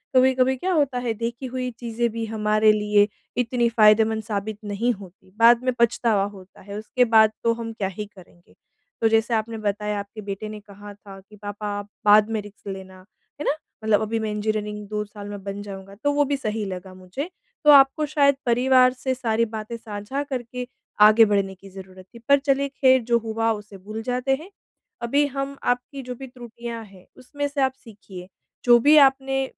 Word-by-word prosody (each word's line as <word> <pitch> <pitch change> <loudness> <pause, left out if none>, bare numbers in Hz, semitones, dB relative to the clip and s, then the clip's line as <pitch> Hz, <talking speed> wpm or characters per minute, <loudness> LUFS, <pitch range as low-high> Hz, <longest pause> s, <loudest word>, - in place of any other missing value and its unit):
कभी-कभी 260 0 +4
क्या 370 +8 -2
होता 280 -5 +1
है, 240 -2 -2
देखी 235 +3 -5
हुई 255 0 -3
चीज़ें 235 0 -1
भी 230 0 -4
हमारे 215 0 +2
लिए 210 -1 +3 0.3
इतनी 240 0 +1
फ़ायदेमंद 220 0 +4
साबित 210 0 -4
नहीं 210 +4 -1
होती। 190 -2 -14
बाद 235 +1 +6
में 255 -1 +1
पछतावा 230 -3 +2
होता 185 0 -16
है। 200 +1 -8
उसके 235 +4 +1
बाद 220 -1 +7
तो 230 - +3
हम 230 -1 -6
क्या 200 -3 -2
ही 210 - -3
करेंगे? 180 -3 -19 0.5
तो 225 - +4
जैसे 225 +1 +2
आपने 225 +1 -1
बताया, 210 0 -1
आपके 205 +2 -8
बेटे 200 +1 -6
ने 215 0 -7
कहा 205 0 -12
था 200 -1 -13
कि, 210 +2 -18
"पापा 205 0 -6
आप 205 0 -9 0.2
बाद 210 +1 +6
में 220 - 0
रिस्क 205 0 -15
लेना।" 190 -1 -8 0.4
है - - -3
ना? - - +3 0.3
"मतलब 220 -1 +3
अभी 220 +1 -1
मैं 220 -1 -2
इंजीनियरिंग 210 -1 -3
2 210 0 -2
साल 205 0 -10
में 205 -1 -8
बन 200 +1 -5
जाऊँगा।" 195 -1 -9
तो 290 - +3
वो 290 0 +3
भी 280 0 -1
सही 215 -3 -3
लगा 185 -1 -7
मुझे। 185 - -6 0.3
तो 300 - +7
आपको 275 +2 +6
शायद 280 -2 +3
परिवार 255 +1 +4
से 260 0 -2
सारी 230 -2 0
बातें 215 +2 -6
साझा 225 +5 -5
करके 250 -2 -5 0.4
आगे 220 +1 +6
बढ़ने 195 -1 0
की 195 +1 -15
ज़रुरत 190 -1 -12
थी। 235 - -12
पर 280 0 +6
चलिए 280 0 0
ख़ैर 260 -2 +4
जो 235 - +6
हुआ 225 0 -1
उसे 210 -1 -10
भूल 215 +4 -7
जाते 255 +2 0
हैं। 360 - -12 0.5
अभी 280 +5 +2
हम 275 0 -3 0.2
आपकी 270 +3 -10
जो 250 -1 -7
भी 265 +2 -9
त्रुटियाँ 235 -2 -8
हैं, 195 -2 -18
उसमें 285 +3 -4
से 285 -1 -3
आप 265 0 +2
सीखिए। 195 -5 -12 0.4
जो 240 -1 +8
भी 290 +6 +5
आपने 270 -1 +4
225 Hz, 195 wpm, -23 LUFS, 205-255 Hz, 0.5 s, जो